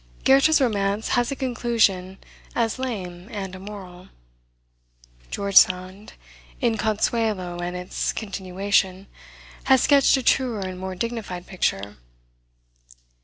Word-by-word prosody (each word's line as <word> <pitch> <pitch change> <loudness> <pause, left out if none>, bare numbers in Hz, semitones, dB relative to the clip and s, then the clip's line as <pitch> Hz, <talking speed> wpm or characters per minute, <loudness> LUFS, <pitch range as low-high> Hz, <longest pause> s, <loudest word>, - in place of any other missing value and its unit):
Goethe's 275 +4 +5
romance 205 -4 0
has 245 +1 +1
a - - -2
conclusion 230 -7 0 0.4
as 230 +1 0
lame 185 -8 -5
and 195 -4 -6
immoral. 185 -2 -10 1.2
George 200 -1 -4
Sand, 185 +3 +4 0.5
in 235 -4 +1
Consuelo 215 -4 -1
and 175 +1 -4
its 180 0 -2
continuation, 195 -1 -1 0.6
has 265 -2 +5
sketched 280 -1 +5
a 265 - -3
truer 240 -5 +1
and 185 -1 -5
more 190 0 -5
dignified 200 -4 -4
picture. 105 - -2
200 Hz, 110 wpm, -24 LUFS, 185-235 Hz, 1.2 s, Goethe's